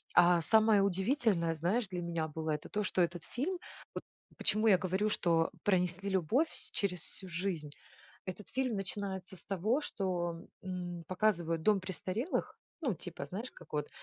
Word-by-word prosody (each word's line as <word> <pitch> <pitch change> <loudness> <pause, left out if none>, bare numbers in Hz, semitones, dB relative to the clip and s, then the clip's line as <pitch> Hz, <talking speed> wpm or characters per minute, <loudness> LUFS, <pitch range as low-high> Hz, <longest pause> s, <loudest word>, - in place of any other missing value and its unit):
А 175 -1 +7
самое 220 +1 +5
удивительное, 195 - +2
знаешь, 190 +8 +1
для 180 -2 -3
меня 170 -2 -1
было- 160 +1 -3
это 150 -1 -2
то, 210 - 0
что 185 - +2
этот 170 0 -1
фильм, 345 +9 -2 0.4
вот - - -3 0.4
почему 215 +2 +2
я 190 -3 +7
говорю, 190 +3 +1
что 165 -4 +2
пронесли 185 0 +1
любовь 195 - +2
вс - - -1
через 180 -5 0
всю 190 - -1
жизнь? 170 -4 -2 0.6
Этот 185 +2 -6
фильм 255 -4 +1
начинается 190 -1 -4
с - - -17
того, 210 - +1
что, 175 - -2 0.2
м, 175 -2 -4
показывают 180 -4 +1
дом 210 0 +5
престарелых. 190 - -2 0.2
Ну 255 -9 +1
типа, 165 -3 -6
знаешь 215 - -5
как - - -15
вот, 150 -1 -1
185 Hz, 165 wpm, -33 LUFS, 170-210 Hz, 0.6 s, А